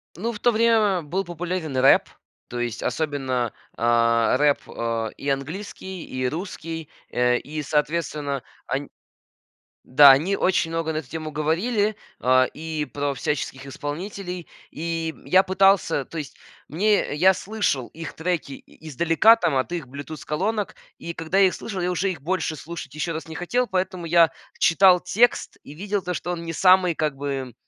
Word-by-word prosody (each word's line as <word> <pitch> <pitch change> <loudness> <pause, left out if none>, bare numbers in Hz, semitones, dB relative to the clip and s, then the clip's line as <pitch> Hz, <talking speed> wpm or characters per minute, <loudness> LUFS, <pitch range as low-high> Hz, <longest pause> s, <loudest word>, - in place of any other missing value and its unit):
Ну, 225 +7 -2
в 210 - -8
то 240 - +3
время 220 -5 +3
был 180 +6 -2
популярен 175 -3 -4
рэп, 130 +1 +5 0.4
то 120 - -5
есть 120 -1 -3
особенно, 130 -6 -1 0.3
а, 115 +1 +3
рэп, 145 0 +3
э, 115 -1 -2
и 140 - -4
английский, 180 +6 -5
и 130 0 -2
русский, 160 0 -5 0.2
э, 125 0 +2
и 155 +4 -5
соответственно, 150 -2 -1 0.3
ань 135 +2 -3 1.0
да, 140 +1 +9
они 165 +9 +2
очень 180 -4 +1
много 165 -1 -2
на - - -2
эту 135 -6 -8
тему 160 -1 -5
говорили, 205 +9 0 0.2
а, 130 +1 +4
и 155 -1 -4
про 145 +2 -2
всяческих 135 0 -3
исполнителей. 175 +5 -6 0.2
И 165 0 -3
я 185 +1 +5
пытался, 190 -7 +3
то - - -11
есть 150 -3 -6 0.3
мне, 200 +1 +1
я 185 +5 +5
слышал 195 - -1
их 165 0 -8
треки 165 -3 -2
и 155 +3 -12
издалека, 170 - +5
там, 160 -11 0
от 130 - -1
их 170 -6 -3
bluetooth-колонок, 155 - -3 0.2
и 170 - -6
когда 165 +2 -3
я 195 -1 +6
их - - -4
слышал, 195 -5 -5
я 180 - 0
уже 190 +2 0
их 160 -7 -7
больше 165 -1 -1
слушать 150 -3 -8
ещё 155 +2 -2
раз 160 +1 -6
не 160 - -7
хотел, 245 +9 0
поэтому 185 -3 -2
я 165 0 +5 0.3
читал 180 +1 +5
текст 225 +7 +1
и 145 - -11
видел 200 +5 -2
то, 180 -1 -4
что 175 - -4
он 170 -1 -5
не 165 -1 -5
самый 185 -1 +5
как 155 -2 -1
бы 135 -3 -4
160 Hz, 165 wpm, -24 LUFS, 140-185 Hz, 1.0 s, да